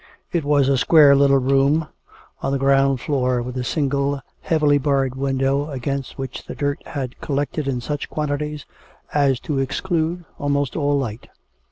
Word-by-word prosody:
It 170 -3 0
was 145 -2 +3
a 135 -2 +2
square 150 -2 +6
little 140 0 +5
room 140 +4 +2 0.5
on 135 - -1
the 140 - +1
ground 135 -1 +3
floor, 130 -3 0
with 125 +1 -6
a 125 - -2
single, 140 +1 0 0.2
heavily 150 -3 +2
barred 135 -2 +1
window, 135 +2 0
against 135 0 -4
which 135 -1 -6
the - - -6
dirt 145 +1 -2
had 130 -4 -5
collected 145 +1 -2
in 125 -3 -1
such 145 +4 -4
quantities 150 -1 -3 0.5
as 140 -4 +2
to 145 -3 -2
exclude 170 +4 -1
almost 145 -2 0
all 145 -2 +1
light. 120 -5 -4
140 Hz, 160 wpm, -21 LUFS, 135-145 Hz, 0.5 s, square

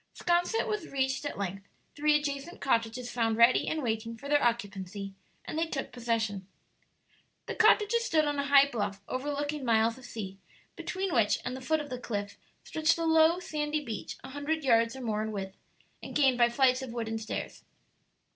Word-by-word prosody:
'Sconset 350 +6 +1
was 425 -1 -2
reached 265 0 -1
at 290 - -4
length, 195 0 -4 0.3
three 300 +1 +3
adjacent 290 +3 -4
cottages 235 0 0
found 225 -2 0
ready 235 +2 +5
and 315 -2 -1
waiting 230 0 -2
for 280 - -9
their 290 0 +3
occupancy, 200 -4 -2 0.3
and 310 - -3
they 330 - +1
took 275 -4 -4
possession. 225 -5 -2 1.0
The - - -4
cottages 445 +1 +4
stood 315 -10 +3
on 290 -1 -1
a 280 - -1
high 280 0 +7
bluff 205 -6 -3
overlooking 290 +2 -3
miles 230 0 +2
of 255 - -13
sea, 195 -5 -7 0.4
between 380 -1 -3
which 220 -4 +3
and 250 - -3
the 260 - -7
foot 315 +4 +1
of 290 -2 -9
the 250 - -4
cliff 205 -4 -4 0.2
stretched 315 +1 +1
a 330 - -1
low 320 +1 +5
sandy 300 -3 -2
beach 225 -3 -5
a 265 - -8
hundred 290 +3 -2
yards 230 -2 +3
or 265 - -7
more 215 -3 -1
in 220 0 -3
width, 195 -2 -5 0.5
and - - -8
gained 265 -4 +4
by 240 0 +6
flights 255 +1 +3
of 255 -3 -6
wooden 225 -2 -3
stairs. 220 - -5
255 Hz, 185 wpm, -30 LUFS, 225-295 Hz, 1.0 s, high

